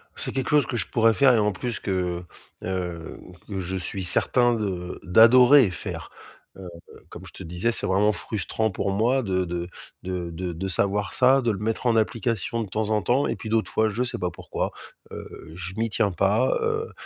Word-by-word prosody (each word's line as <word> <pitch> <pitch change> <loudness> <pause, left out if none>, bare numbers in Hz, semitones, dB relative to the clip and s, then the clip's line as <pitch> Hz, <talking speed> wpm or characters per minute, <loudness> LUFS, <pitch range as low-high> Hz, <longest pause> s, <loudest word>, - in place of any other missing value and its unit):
C'est - - -5
quelque 135 -1 -2
chose 150 -3 +4
que 120 - -3
je 105 - -2
pourrais 115 -1 +3
faire 135 +1 +5
et 115 - +3
en 105 0 +2
plus 120 +4 -4
que, 90 -2 -2 0.4
hem, 90 -3 -5 0.3
que 100 -2 -4
je 95 +1 -3
suis 95 +1 -2
certain 120 +7 +2
de 95 -5 -4
d'adorer 120 +5 +6
faire. 90 - -6 0.5
Heu, 95 -1 -9 0.4
comme 90 - -10
je 90 - -10
te - - -8
disais, 90 +7 -1
c'est - - -3
vraiment 100 +3 +3
frustrant 110 +1 -2
pour 100 +1 -2
moi 120 +7 +2
de 95 -5 -1
de 85 0 -4 0.3
de 90 -2 -4
de 90 +2 -4
de 85 +3 -4
savoir 100 +1 0
ça, 130 +2 +4
de 120 -2 +1
le 100 - -4
mettre 110 +3 -2
en 120 -2 +3
application 115 0 -1
de - - -7
temps 110 +2 -2
en 105 -1 +1
temps 125 +9 +2
et - - -2
puis 110 - -8
d'autres 110 -5 0
fois 110 +3 +2
je 115 +4 -1
sais 125 - -2
pas 90 -1 -2
pourquoi, - - -4 0.4
heu, 80 - -10
je 90 +2 -7
m'y 115 +1 -1
tiens 105 -1 +1
pas, 100 +8 +2
heu, 450 0 -2
105 Hz, 210 wpm, -24 LUFS, 90-115 Hz, 0.5 s, d'adorer